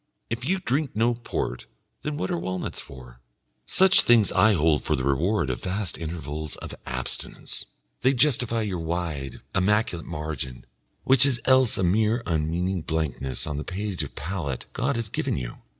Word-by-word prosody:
If 120 +5 -2
you 190 - +3
drink 145 - -1
no 115 +2 +3
port, 115 - -4 0.3
then 150 -1 -3
what 95 - -2
are 85 - 0
walnuts 95 +1 -3
for? 60 -3 -12 0.5
Such 190 0 +7
things 115 -3 +5
I 110 0 +5
hold 80 -5 +3
for - - +1
the 65 - -2
reward 70 +3 +1
of - - -4
vast 95 +1 -2
intervals 80 -2 -4
of - - -8
abstinence; 65 0 -4 0.3
they 130 +3 +4
justify 120 -4 +2
your 95 -4 -2
wide, 80 -5 -3
immaculate 95 -3 +1
margin, 75 -6 -5 0.4
which 135 0 +5
is 135 -4 +3
else 130 -3 +4
a 95 - 0
mere 110 +6 +2
unmeaning 85 +3 0
blankness 75 -5 -2
on 75 -2 -3
the 75 - -3
page 95 -2 -3
of 75 - -6
palate 75 -3 -3
God 140 +2 0
has 115 -2 -2
given - - -1
you! - - -5
90 Hz, 165 wpm, -26 LUFS, 75-115 Hz, 0.5 s, Such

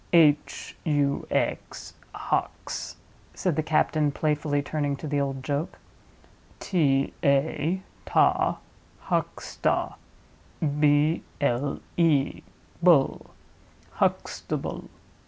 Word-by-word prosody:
"H, 150 -3 +3
U, 145 -3 +1
X—Hux," - - -3 0.4
said 180 -5 0
the 155 - +1
captain, 155 -1 +2
playfully 150 -1 0
turning 145 -1 -1
to 140 - -8
the 145 -1 0
old 135 -1 -3
joke: 145 +3 -2 0.8
"T, 140 -7 +1
A—ta, 150 +6 +1 0.4
Huxta; - - -1 0.9
B, 150 +2 +3 0.2
L, 140 0 0 0.2
E—ble; 160 0 +1 0.6
Huxtable." - - -2
145 Hz, 75 wpm, -26 LUFS, 140-160 Hz, 0.9 s, H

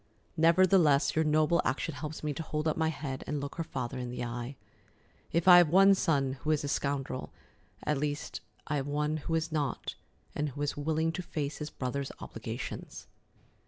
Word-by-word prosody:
Nevertheless, 165 -3 +4
your 160 - +3
noble 155 +2 +3
action 140 +4 -1
helps 150 +3 -6
me 150 -1 -1
to 160 - -5
hold 155 0 -2
up 155 - +1
my 160 0 +1
head 140 -4 -4
and 150 0 -1
look 140 0 -5
her 165 - -1
father 130 -5 -4
in 125 -1 -4
the 125 - -4
eye. 120 +3 -5 0.8
If 170 +2 +1
I 180 -1 +11
have 175 -3 +5
one 195 +4 +7
son 140 -8 +1
who 155 - -3
is 155 -2 +2
a - - -2
scoundrel, 140 -2 -2 0.5
at 150 -2 0
least 145 0 -3 0.2
I 150 - -1
have 135 0 -2
one 150 +1 0
who 165 +2 -2
is 160 0 -1
not, 145 -4 -2 0.4
and 150 0 -1
who 145 +2 -7
is 145 - -1
willing 160 +2 0
to 175 - -4
face 150 -4 -4
his 150 0 -4
brother's 135 +1 -3
obligations." - - -6
150 Hz, 195 wpm, -30 LUFS, 140-160 Hz, 0.8 s, I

